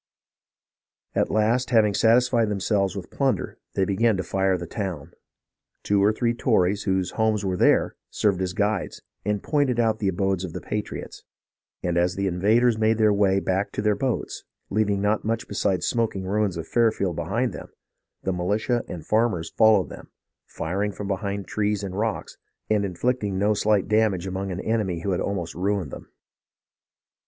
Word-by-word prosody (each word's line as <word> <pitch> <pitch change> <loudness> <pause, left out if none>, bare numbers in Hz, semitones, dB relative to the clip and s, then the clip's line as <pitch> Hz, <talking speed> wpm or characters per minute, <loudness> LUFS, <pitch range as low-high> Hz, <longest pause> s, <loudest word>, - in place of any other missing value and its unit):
At - - +1
last, 110 +4 +1
having 110 -4 +4
satisfied 115 +1 +3
themselves 100 -1 0
with 95 -3 -7
plunder, 135 -2 -1 0.2
they 95 - +2
began 105 +2 +2
to 95 - -2
fire 95 0 +1
the 85 - -6
town. 85 -4 -5 0.7
Two 100 -1 +2
or 105 - +5
three 115 +2 0
Tories, 105 -5 +1
whose 95 -2 0
homes 110 -2 0
were 95 -1 0
there, - - +3
served 100 -3 +1
as 90 -1 -1
guides, 105 0 -1 0.2
and 105 0 -1
pointed 140 -5 +1
out 110 -2 +2
the 100 - 0
abodes 95 0 0
of 90 -3 -5
the - - -4
patriots; 105 -1 -5 0.6
and 85 -1 +1
as 90 +1 +1
the 100 - -1
invaders 110 +6 +2
made 110 0 +3
their 110 -2 +4
way 100 -1 +3
back 95 +1 -1
to - - -2
their 105 -1 +3
boats, 120 +4 -3 0.3
leaving 105 -1 +1
not 105 +1 +1
much 115 +1 -2
besides 100 -2 0
smoking 115 -5 0
ruins 100 -1 0
of 80 0 -5
Fairfield 110 -7 +1
behind 115 +12 -1
them, - - -8 0.6
the 95 - 0
militia 105 +7 0
and 80 -4 -7
farmers 105 -7 +1
followed 110 - +4
them, - - -11 0.4
firing 100 +5 -2
from 100 0 -6
behind 100 0 -3
trees 105 -1 -1
and 95 -2 -4
rocks, 110 +1 -3 0.3
and 105 -1 +3
inflicting 105 +1 -1
no 105 +2 +2
slight 105 -1 +1
damage 105 -4 +2
upon 95 +1 -3
an 90 - -4
enemy 100 -7 -1
who 100 - -1
had 90 - 0
almost 90 -5 -3
ruined 95 -4 -1
them. - - -9
100 Hz, 170 wpm, -24 LUFS, 95-110 Hz, 0.7 s, or